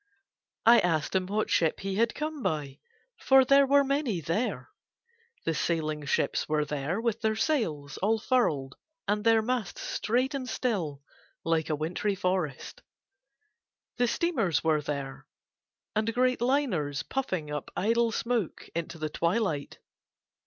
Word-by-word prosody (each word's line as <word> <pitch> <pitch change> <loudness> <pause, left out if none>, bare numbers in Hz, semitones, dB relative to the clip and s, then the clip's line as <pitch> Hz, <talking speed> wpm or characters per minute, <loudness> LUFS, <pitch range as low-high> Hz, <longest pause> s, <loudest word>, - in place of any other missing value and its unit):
I 235 +1 +8
asked 160 -4 0
him 185 -1 +1
what 210 +2 -1
ship 165 -2 +2
he 195 0 -3
had 230 +4 +1
come 305 -1 -4
by, 145 - -2 0.4
for 265 -1 +5
there 275 +1 +5
were 280 +1 +5
many 275 - 0
there. 165 - -2 0.7
The 165 - +1
sailing 155 -2 -1
ships - - 0
were 150 -1 +1
there 150 +6 -2
with 230 -1 -1
their 220 -1 +1
sails 170 - -1
all 220 +4 +2
furled 155 - 0 0.3
and 210 +1 0
their 225 -1 +4
masts 235 -6 -2
straight 250 +5 0
and 260 -2 -4
still 165 - -2 0.4
like 165 -1 0
a 155 - +1
wintry 175 +7 -1
forest; 180 -7 -2 1.2
the 245 0 +3
steamers 230 - 0
were 155 -2 +2
there, 140 -2 -5 0.7
and 215 +1 +1
great 255 -1 +2
liners, 190 - 0
puffing 185 - -3
up 150 -1 -4
idle 230 +3 +2
smoke 230 -5 -2
into 170 0 -4
the 155 -1 -3
twilight. 170 -5 -1
195 Hz, 140 wpm, -28 LUFS, 155-240 Hz, 1.2 s, I